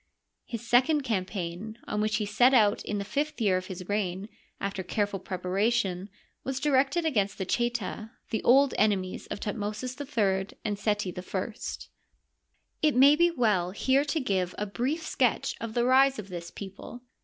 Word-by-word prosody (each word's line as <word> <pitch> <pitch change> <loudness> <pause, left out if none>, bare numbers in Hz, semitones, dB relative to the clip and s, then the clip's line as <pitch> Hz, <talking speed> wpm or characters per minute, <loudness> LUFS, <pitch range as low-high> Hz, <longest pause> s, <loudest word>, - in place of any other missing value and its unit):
His 230 -1 -6
second 265 +6 +4
campaign, 195 -1 -3
on 210 - -2
which 215 0 +1
he 215 -1 0
set 245 +6 +4
out 210 -3 +4
in 210 - -3
the 200 - -3
fifth 285 +9 -2
year 200 -5 +3
of 185 0 -2
his 185 -1 -7
reign, 200 -1 -2 0.3
after 195 -1 -3
careful 200 +2 -1
preparation, 190 +1 -1 0.3
was 270 0 -3
directed 280 +3 +2
against 210 -10 +1
the 190 - -3
Cneta, 230 -1 -2 0.2
the 220 - 0
old 270 +2 +5
enemies 195 -3 0
of - - -5
Thutmosis 210 +4 -4
III 200 -9 -1
and 205 -2 -2
Seti 205 -3 0
I. 190 +4 -4 1.3
It 305 -3 +3
may 275 +3 +7
be 345 +2 +4
well 215 - +1
here 265 +8 +2
to 305 +2 -1
give 190 -8 -1
a 210 - -1
brief 255 +10 -2
sketch 255 -6 +1
of 230 -1 -5
the 240 0 +2
rise 265 +1 +5
of 205 -2 -7
this 170 -1 -6
people. 200 +6 -9
215 Hz, 165 wpm, -28 LUFS, 195-255 Hz, 1.3 s, may